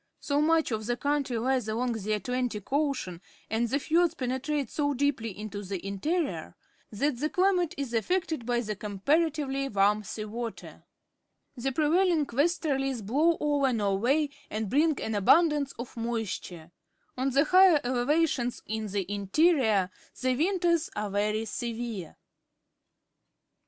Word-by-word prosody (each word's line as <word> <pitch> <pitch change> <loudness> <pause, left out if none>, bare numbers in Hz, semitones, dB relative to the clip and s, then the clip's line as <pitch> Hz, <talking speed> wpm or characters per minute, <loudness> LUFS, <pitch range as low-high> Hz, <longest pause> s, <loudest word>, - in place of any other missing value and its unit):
So 285 0 0
much 320 -2 +2
of 220 -1 -3
the 240 0 0
country' 285 -3 0
lies 255 0 0
along 240 +3 -1
the 215 -2 -2
Atlantic 245 0 -3
Ocean 275 - -1 0.3
and 230 +1 +1
the 270 - +1
fiords 335 +3 +2
penetrate 265 +1 -2
so 285 -2 0
deeply 265 -4 0
into 210 -1 -6
the 195 -2 -5
interior 295 - -2 0.4
that 245 +4 -1
the 305 +3 0
chmate 365 -2 +1
is 275 -4 -4
affected 320 - 0
by 240 0 0
the 215 -2 -4
com.parativeh^ 275 - 0
warm 205 +2 +3
sea 215 +1 -5
water. 230 +2 -7 0.7
The 265 +1 -2
prevailing 320 +3 +2
westerlies 270 - 0
blow 310 +10 +2
over 285 -3 +2
Norway 235 +8 +1 0.2
and 215 -1 -3
bring 305 +1 +3
an 220 - -3
abundance 290 - +4
of 240 +1 -8
moisture. 225 -8 -4 0.4
On 260 +2 0
the 275 +2 +3
higher 365 -1 +6
elevations 255 0 0
in 220 0 -3
the 200 -1 -2
interior 205 - +2 0.3
the 255 0 +1
winters 340 +1 +1
are 210 -1 -3
very 210 +2 0
severe. 230 -5 -5
255 Hz, 135 wpm, -28 LUFS, 215-300 Hz, 0.7 s, higher